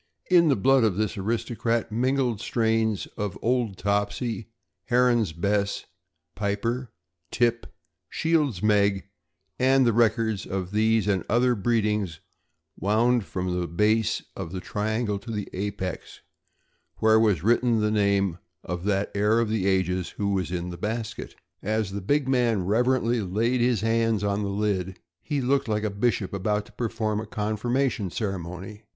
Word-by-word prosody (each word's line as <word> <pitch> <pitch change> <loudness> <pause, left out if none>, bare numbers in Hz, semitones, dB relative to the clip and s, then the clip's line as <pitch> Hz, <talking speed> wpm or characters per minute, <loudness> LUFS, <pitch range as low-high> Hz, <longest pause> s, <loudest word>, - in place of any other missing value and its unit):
In 170 -2 +6
the 140 - +4
blood 130 +4 +4
of 105 -5 +2
this 110 0 -1
aristocrat 115 +2 -1
mingled 125 -1 0
strains 110 -3 0
of 100 -3 -3
Old 120 -5 0
Topsey, 100 +2 -1 0.4
Heron's 120 -5 +3
Bess, 100 +4 -1 0.5
Piper, 115 +5 -2 0.4
Tip, 120 -1 +1 0.4
Shields' 150 - 0
Meg, 100 -2 +2 0.5
and 130 +1 +4
the 115 - +3
records 110 -2 +1
of 95 -1 -3
these 110 0 +2
and 95 -3 +1
other 125 +3 +3
breedings 105 -6 0 0.6
wound 115 +2 +2
from 90 +2 -3
the 90 - -2
base 105 +5 +1
of 85 - -6
the 95 - -3
triangle 105 +2 -2
to 105 - -12
the 105 -3 -3
apex, 95 -2 -5 0.8
where 110 0 +4
was 105 -8 +2
written 120 +1 +3
the 105 0 +1
name 100 -4 +1 0.2
of 90 +1 -5
that 100 -1 0
heir 105 +3 +2
of 115 -2 0
the 105 -3 0
ages 95 -1 +1
who 100 -1 0
was 90 -3 -1
in 90 0 -3
the 85 - -8
basket. 110 +1 -4 0.3
As 110 -1 -1
the 100 +1 -4
big 140 +8 +1
man 120 -7 +2
reverently 120 +2 +2
laid 115 +6 0
his 120 -3 +2
hands 115 -1 +1
on 100 0 0
the 100 - -2
lid, 100 -2 -1 0.2
he 145 -3 -2
looked 135 +1 +1
like 105 -1 0
a 110 - -1
bishop 100 -2 -1
about 105 +2 -1
to - - -17
perform 110 -2 -2
a 110 - -6
confirmation 110 +1 -1
ceremony. 95 +1 -5
105 Hz, 150 wpm, -26 LUFS, 100-115 Hz, 0.8 s, In